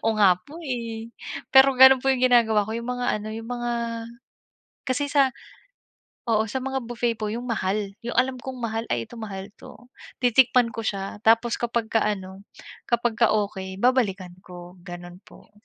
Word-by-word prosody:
Oo 225 - +3
nga 190 -4 +6
po, 305 +4 -11
eh. 230 -3 -5 0.4
Pero 265 0 +7
gano'n 265 0 +8
po 270 - +2
yung 255 -1 -2
ginagawa 225 -4 +4
ko 220 - -5
yung 235 +1 -6
mga 245 0 -3
ano, 215 - -7
yung 225 +1 -7
mga 240 -1 -2 1.1
kasi 275 +3 -1
sa 275 -3 +3 1.0
oo 220 -1 +3
sa 250 - -4
mga 265 0 -2
buffet 235 -1 -1
po 210 - -2
yung 240 +2 -4
mahal 200 -2 -1
yung 240 - -4
alam 255 +1 +2
kong 260 +1 -7
mahal, 225 0 -2
"Ay 115 -1 -1
ito - - -12
mahal 195 -2 -6
'to." 245 +1 -15 0.3
Titikman 245 -1 +4
ko - - -4
siya 195 0 -4
tapos 230 +1 +4
kapagka 230 -1 0
ano, 195 -2 -4 0.4
kapagka 235 -1 +2
okey 190 -2 -3
babalikan 205 -8 +1
ko, 180 0 -12
gano'n 175 0 -10
po. - - -18
230 Hz, 170 wpm, -24 LUFS, 205-245 Hz, 1.1 s, gano'n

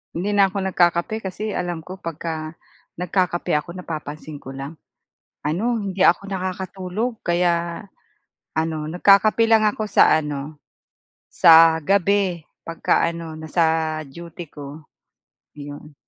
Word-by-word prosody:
Hindi 200 +5 -1
na 195 -1 +4
ako 200 - -5
nagkakape 175 +5 +1
kasi 200 +3 -4
alam 175 -2 -3
ko 180 +4 -9
'pagka 160 -3 -5 0.5
nagkakape 180 -2 0
ako, 150 +3 -2
napapansin 155 -3 -7
ko 135 - -8
lang 135 +4 -7 0.7
ano, 215 +10 -1
hindi 195 -1 -4
ako 195 +3 +3
nakakatulog. 190 +4 -4
Kaya 170 +1 0 0.7
ano, 160 0 0
nagkakape 205 +6 +4
lang 220 -1 +5
ako 215 +1 -4
sa 205 - +5
ano, 150 0 -6 0.7
sa 165 0 +7
gabi 195 -1 +1 0.2
'pagka 165 0 0
ano, 165 -1 -7
nasa 160 0 0
duty 170 +4 -10
ko. 145 +1 -10 0.7
Iyon. 145 +1 -9
170 Hz, 120 wpm, -22 LUFS, 160-195 Hz, 0.7 s, sa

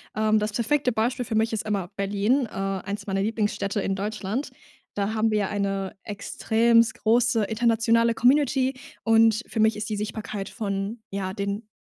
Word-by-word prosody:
Ähm, 215 0 +3
das 210 0 -2
perfekte 255 +3 +1
Beispiel 240 +3 -1
für 225 - -5
mich 225 +1 +1
ist 220 0 -1
immer 195 -4 -1
Berlin, 205 +7 +1
äh, - - -19
eins 195 +1 -4
meiner 195 0 0
Lieblingsstädte 210 -2 -1
in 195 0 -1
Deutschland. 210 +5 -3 0.4
Da 205 +1 -1
haben 220 +1 +2
wir 215 - +2
ja 200 - -1
eine 195 -1 -2
extrem 225 +2 +2
große, 230 0 +2
internationale 230 +1 +2
Community 265 +1 +3 0.3
und 225 0 +4
für 225 - -4
mich 220 0 +4
ist 210 +1 -4
die 215 - -1
Sichtbarkeit 210 -1 -4
von, 200 0 -3
ja, 190 -1 -3
den 200 +2 -4
215 Hz, 170 wpm, -25 LUFS, 200-230 Hz, 0.4 s, und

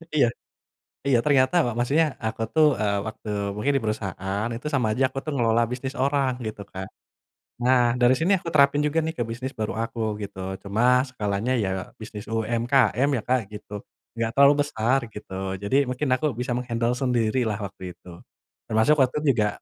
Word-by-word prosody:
Iya 140 -5 +5 0.8
iya, 125 -4 +4
ternyata 140 +2 +3
wa 120 - -1
maksudnya, 150 +4 +2
aku 110 0 -3
tuh, 155 -1 +6
e - - 0 0.2
waktu 110 0 -7 0.3
mungkin 140 +7 0
di 135 - +1
perusahaan, 100 0 -2
itu 130 +6 -6
sama 125 -5 +2
aja 135 - +1
aku 135 - -12
tuh 155 - -4
mengelola 115 -1 +3
bisnis 130 +2 -4
orang, 140 -2 +2 0.2
gitu 105 -1 -6
kan. 95 0 -6 0.8
Nah, 125 0 +5 0.2
dari 125 +1 +5
sini 175 +5 +2
aku 170 - -11
terapin 140 0 +5
juga 155 +2 +1
nih 160 - -2
ke 120 - 0
bisnis 130 +4 -5
baru 105 -3 -1
aku 115 0 -6 0.2
gitu, 100 -1 -8 0.2
cuma 120 +6 +3
skalanya 110 0 -2
ya, 95 - -1 0.3
bisnis 105 -1 -8
UMKM 120 +4 +2
ya - - -3
Kak 130 0 +3 0.2
gitu, 105 - -11 0.4
enggak 115 -1 -1
terlalu 140 +1 +7
besar, 130 -1 +1 0.2
gitu. 105 -2 -9 0.3
Jadi 100 +6 0
mungkin 130 +3 -2
aku 155 - -3
bisa 125 0 -2
meng-handle 120 -1 -1
sendirilah 120 -3 0
waktu 95 -1 -10
itu. 90 - -16 0.6
Termasuk 110 +7 +3
waktu 130 +2 -1
itu - - -7
juga, 105 -2 +2
125 Hz, 175 wpm, -25 LUFS, 110-135 Hz, 0.8 s, terlalu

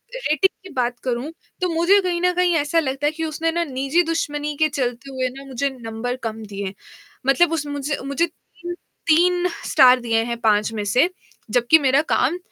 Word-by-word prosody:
Rating 380 - +2 0.2
की - - -12
बात 245 -2 -1
करूँ, 255 +4 -2 0.3
तो 365 - +1
मुझे 345 +5 +4
कहीं 355 -2 -1
न 360 0 +3
कहीं 355 -1 +2
ऐसा 310 +1 +2
लगता 270 -2 -2
है - - +1
कि 325 +1 -4
उसने 320 +1 -1
ना 340 +1 0
निजी 275 +3 0
दुश्मनी 295 -3 -2
के 310 +1 +3
चलते 260 -1 -3
हुए 260 -1 -1
ना, 270 +2 -11
मुझे 275 +1 -2
नंबर 225 +2 -4
कम 225 -1 -4
दिए 200 -1 -6
हैं। 190 - -5 0.5
मतलब 330 +5 +4
उस 320 -2 -1
मुझ 285 0 -4
अ, 280 - -1
मुझे 280 +4 0
तीन 340 +1 -13 0.4
तीन 355 +2 +4 0.2
स्टार 255 0 +7
दिए 225 -2 +1
हैं 235 0 -3
5 215 -1 +2
में 215 -2 -3
से, 255 - +3 0.4
जबकि 245 +7 +5
मेरा 275 0 +3
काम 285 +8 +2
280 Hz, 200 wpm, -22 LUFS, 245-330 Hz, 0.5 s, स्टार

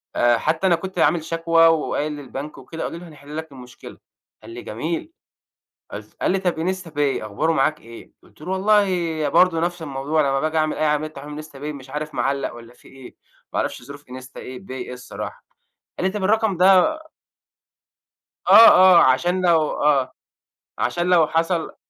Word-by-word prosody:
آآ 120 0 +3
حتى 160 +9 0
أنا 175 - +4
كنت 185 +1 -7
عامل 160 +2 +2
شكوى، 165 0 +3
وقايل 155 -1 0
للبنك 145 0 -8
وكده، 160 +5 -8
قالوا - - -5
لي 180 - -12
هنحل 150 -2 -11
لك 160 -1 -7
المشكلة." 125 -2 -13 0.5
قال - - -11
لي: 120 +1 -8
"جميل" 165 - -5 0.8
قُلت - - -10
قال - - +1
لي: 195 - 0
"طب 180 -1 -1
instapay 155 -9 -2
أخباره 110 +10 -1
معاك 150 +2 0
إيه؟" 115 +1 -13
قُلت - - -22
له: 180 - -6
"والله 205 +2 +3
ي 165 -5 -2
برضه 175 +2 +3
نفس 175 0 -2
الموضوع 145 +1 -1
لمّا 135 -1 +1
باجي 155 +2 -1
أعمل 155 -1 0
أي 155 - 0
عملية 150 0 0
تحويل 150 -1 -10
من 155 - -7
instapay 150 -2 -16 0.2
مش 135 -1 -12
عارف 150 +2 -5
معلّق 135 +3 -1
والّا 120 0 -13
في - - -21
إيه؟ 135 -2 -14 0.4
ما - - -1
اعرفش - - -3
ظروف 140 +3 -11
insta 130 +1 -11
إيه 130 0 -8
pay - - -11
إيه 125 -1 -6
الصراحة." 125 0 -9 0.5
قال 185 - +1
لي: 190 - -3
"طيب 210 -2 -4
الرقم 215 -1 +1
ده" 190 - +4 1.5
آه، 220 +4 +10
آه 185 -3 +7
عشان 175 +8 +2
لو 165 -4 +3
آه 140 -3 +2 0.6
عشان 175 0 -1
لو 170 -4 +4
حصل 165 +1 -1
155 Hz, 185 wpm, -21 LUFS, 135-175 Hz, 1.5 s, آه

